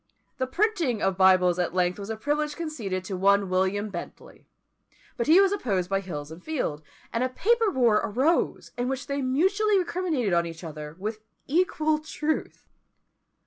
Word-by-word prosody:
The 260 - 0
printing 345 - 0
of 195 -1 +1
Bibles 185 -1 +4
at 175 0 -1
length 180 +1 +1
was 200 +1 -7
a 220 - -3
privilege 295 +4 -1
conceded 230 - -4
to 190 0 -5
one 200 +1 +3
William 190 +3 0
Bentley; 175 -2 -9 0.7
but 235 - -2
he 325 +5 +7
was 390 -1 +5
opposed 195 - -1
by 195 - +2
Hills 155 -6 -6
and 165 +2 -11
Field; 250 - -2 0.3
and 235 - +1
a 255 - 0
paper 455 - +2
war 240 - +3
arose, 265 +10 0
in 245 - 0
which 265 -1 -3
they 280 0 -2
mutually 385 +11 +2
recriminated 340 - -1
on 170 0 +2
each 165 +1 -9
other, 150 -1 -7
with 215 +3 -5 0.2
equal 310 -1 +1
truth. 310 0 -3
230 Hz, 170 wpm, -26 LUFS, 185-310 Hz, 0.7 s, he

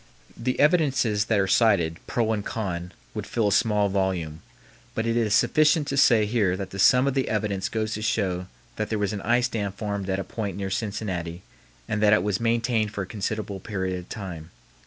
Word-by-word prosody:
The 125 +2 -2
evidences 135 - +3
that 110 -1 +1
are 95 - +3
cited, 95 -5 +3
pro 110 -2 0
and 105 -2 -2
con, 90 -6 -4 0.2
would - - -5
fill 110 -3 +1
a - - -2
small 105 -2 +3
volume, 95 -5 -1 0.5
but 110 - -1
it 115 0 0
is 110 -3 +2
sufficient 155 0 +3
to 140 - -1
say 115 -5 +5
here 105 -4 +1
that 95 -1 -6
the 100 - -7
sum 125 +7 +5
of 140 - +1
the 135 -1 0
evidence 105 -3 -1
goes 110 -1 -2
to 105 - -4
show 95 -4 -1 0.3
that 110 - -2
there 110 - 0
was 105 0 -1
an 100 - -4
ice 120 +3 +2
dam 105 -4 -3
formed 100 -1 -4
at 95 - 0
a 95 - -2
point 100 -3 -5
near 95 -1 -3
Cincinnati 95 -4 -3 0.4
and 105 - -1
that 105 -1 +5
it 105 - +3
was 100 -2 0
maintained 115 -2 +1
for 100 -2 -3
a - - -6
considerable 105 0 -4
period 95 -2 -3
of 90 - -12
time. 85 -6 -7
105 Hz, 210 wpm, -25 LUFS, 95-115 Hz, 0.5 s, say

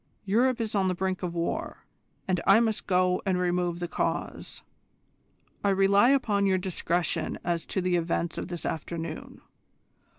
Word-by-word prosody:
Europe 240 +5 +2
is 225 -2 -2
on 195 -2 +2
the 185 - 0
brink 190 0 -2
of 175 -2 -3
war, 170 0 -3 0.4
and 180 -2 +1
I 195 +3 +7
must 220 -2 0
go 180 -1 +2
and 190 -2 +1
remove 175 -1 0
the 175 - -3
cause. - - -3 1.0
I 200 - +3
rely 195 +4 +4
upon 210 -7 +2
your 190 -1 +3
discretion 180 -2 -1
as 170 -1 -2
to 190 - -1
the 180 -1 +1
events 170 0 -1
of - - -5
this 175 -1 -6
afternoon. 160 0 -5
185 Hz, 160 wpm, -27 LUFS, 175-200 Hz, 1.0 s, I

